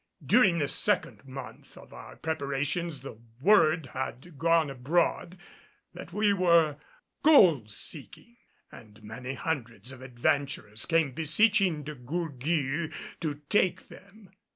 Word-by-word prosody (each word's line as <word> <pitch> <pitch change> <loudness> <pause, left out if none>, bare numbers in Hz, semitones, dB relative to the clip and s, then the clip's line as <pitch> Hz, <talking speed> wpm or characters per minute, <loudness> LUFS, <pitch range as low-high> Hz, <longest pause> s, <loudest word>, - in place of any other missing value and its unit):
During 195 -9 +4
the 145 -3 0
second - - 0
month 130 -1 -10
of - - -14
our - - -11
preparations 150 0 -2
the 130 -5 -10 0.2
word 160 -4 +3
had 130 +5 -6
gone 165 -3 +2
abroad 165 +6 -1 0.6
that - - -10
we 210 -1 +2
were 170 -5 +3 0.4
gold 175 - +5
seeking 160 - -7 0.3
and 110 0 -15
many 125 +5 -7
hundreds 125 -4 -4
of 130 -1 -11
adventurers 125 -3 -2
came 165 -4 +2
beseeching 170 - +2
De 150 +2 -6
Gourgues 150 +2 -2 0.3
to 150 -3 -4
take 190 0 +1
them. 200 0 -16
155 Hz, 120 wpm, -28 LUFS, 130-175 Hz, 0.6 s, gold